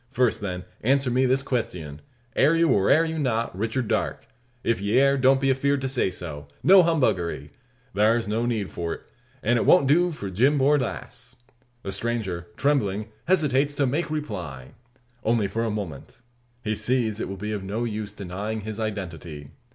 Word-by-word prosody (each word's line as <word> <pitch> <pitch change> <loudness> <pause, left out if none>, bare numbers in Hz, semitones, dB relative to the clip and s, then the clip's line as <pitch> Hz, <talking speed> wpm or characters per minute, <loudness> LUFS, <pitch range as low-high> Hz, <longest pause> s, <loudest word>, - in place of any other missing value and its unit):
First, 125 -4 +1
then, 90 -3 -4 0.2
answer 135 +2 +2
me 130 +2 +3
this 130 +2 +2
questyun: 90 - -3 0.4
Air 150 +4 +4
you, 165 0 +3
or 100 -1 +3
air 160 +2 +5
you 160 0 -3
not, 115 -7 -1
Richard 110 +4 -2
Darke? - - -1 0.4
If 115 -5 0
ye 100 +4 +1
air, 140 0 +4
don't 135 0 +4
be 135 0 +1
afeerd 140 +2 +1
to 135 - -1
say 130 -7 +1
so. 80 -6 -7 0.2
No 190 +1 +8
humbuggery! 100 - 0 0.4
Thar's 110 +3 +2
no 115 +3 0
need 110 -5 -2
for't. 85 -1 -4 0.4
An' 120 +2 +3
it - - 0
won't 140 - +6
do 175 +6 +3
for 100 -11 -6
Jim 130 +10 +3
Borlasse." 135 -2 -1 0.5
The 95 - -4
stranger, 100 -7 -2
trembling, 110 -7 0 0.2
hesitates 145 -5 +2
to 140 - +2
make 150 +6 -1
reply. 90 - -5 0.5
Only 115 -3 +2
for 115 +4 -2
a 115 - 0
moment. 100 -10 -6 0.4
He 110 - -1
sees 110 0 0
it - - -3
will 95 - -5
be 105 +3 -4
of 105 -2 -3
no 105 +5 -3
use 105 -3 -3
denying 105 +2 -5
his 110 +1 -6
identity. 85 -9 -5
115 Hz, 175 wpm, -25 LUFS, 100-135 Hz, 0.5 s, No